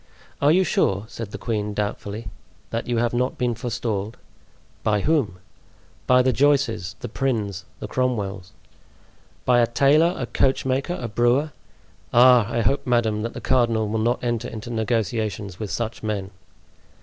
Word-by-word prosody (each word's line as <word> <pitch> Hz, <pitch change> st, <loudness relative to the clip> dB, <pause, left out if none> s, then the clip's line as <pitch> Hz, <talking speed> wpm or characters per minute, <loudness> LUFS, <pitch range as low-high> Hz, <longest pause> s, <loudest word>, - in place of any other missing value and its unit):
"Are 145 Hz, +1 st, +5 dB
you 185 Hz, +4 st, +4 dB
sure," 100 Hz, -, +1 dB
said 115 Hz, -2 st, -7 dB
the -, -, -6 dB
queen 105 Hz, -3 st, -2 dB
doubtfully, 105 Hz, +1 st, -3 dB, 0.4 s
"that 115 Hz, -, -3 dB
you 120 Hz, -1 st, 0 dB
have 120 Hz, 0 st, +1 dB
not 125 Hz, +2 st, 0 dB
been 125 Hz, -1 st, 0 dB
forestalled?" 115 Hz, -3 st, -3 dB, 0.6 s
"By 105 Hz, -1 st, +1 dB
whom?" 135 Hz, -, +1 dB, 0.7 s
"By 125 Hz, 0 st, +5 dB
the 130 Hz, 0 st, +2 dB
Joices, 130 Hz, -10 st, +1 dB
the -, -, -4 dB
Prinns, 105 Hz, -7 st, -2 dB
the -, -, -5 dB
Cromwells?" 105 Hz, -7 st, -2 dB, 0.9 s
"By 125 Hz, -1 st, +4 dB
a 120 Hz, -, +4 dB
tailor, 145 Hz, +8 st, +4 dB
a -, -, -2 dB
coachmaker, 135 Hz, +5 st, 0 dB
a 120 Hz, -, -3 dB
brewer! 120 Hz, +7 st, +2 dB, 0.6 s
Ah! 120 Hz, -2 st, +6 dB
I 115 Hz, -, 0 dB
hope, 140 Hz, +5 st, 0 dB
madame, 115 Hz, -3 st, +1 dB
that 115 Hz, +1 st, -4 dB
the -, -, -7 dB
cardinal 115 Hz, -4 st, +2 dB
will 110 Hz, +1 st, -1 dB
not 120 Hz, +3 st, 0 dB
enter 120 Hz, 0 st, -1 dB
into 110 Hz, +2 st, -7 dB
negotiations 110 Hz, -4 st, -2 dB
with 110 Hz, -2 st, -4 dB
such 115 Hz, +1 st, -3 dB
men!" 100 Hz, -3 st, -3 dB
115 Hz, 155 wpm, -23 LUFS, 105-125 Hz, 0.9 s, Ah